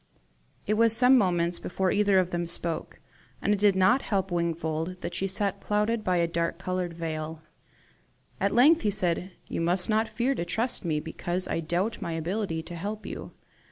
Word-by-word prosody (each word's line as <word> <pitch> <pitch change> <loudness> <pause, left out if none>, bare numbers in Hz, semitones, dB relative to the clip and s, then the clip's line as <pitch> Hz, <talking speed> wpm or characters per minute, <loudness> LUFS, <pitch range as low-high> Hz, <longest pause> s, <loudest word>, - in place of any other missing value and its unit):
It 210 - +1
was 225 +1 +6
some 250 +2 +7
moments 175 -6 +1
before 185 +1 -1
either 205 -1 +3
of 185 -1 +2
them 175 0 -2
spoke, 170 -1 -3 0.4
and 205 - +1
it 205 - -1
did 205 -1 +4
not 210 +8 +4
help 195 -3 -1
Wingfold 170 0 -2
that 170 - -5
she 190 +2 -1
sat 200 +1 -1
clouded 210 +2 0
by 180 -2 +1
a 170 - +3
dark 170 0 -2
coloured 185 -2 -3
veil. 160 -1 -5 1.0
At 200 - +1
length 295 +8 +5
he 210 - +1
said, 180 -2 0 0.2
"You - - -3
must 180 +3 +1
not 220 +1 +1
fear 240 +5 0
to 200 - -3
trust 225 +8 0
me 155 -4 0
because 175 +3 -2
I - - -1
doubt 175 +7 -2
my 170 - -3
ability 165 0 -2
to 175 - -8
help 210 +5 -5
you. - - -7
185 Hz, 190 wpm, -27 LUFS, 170-210 Hz, 1.0 s, some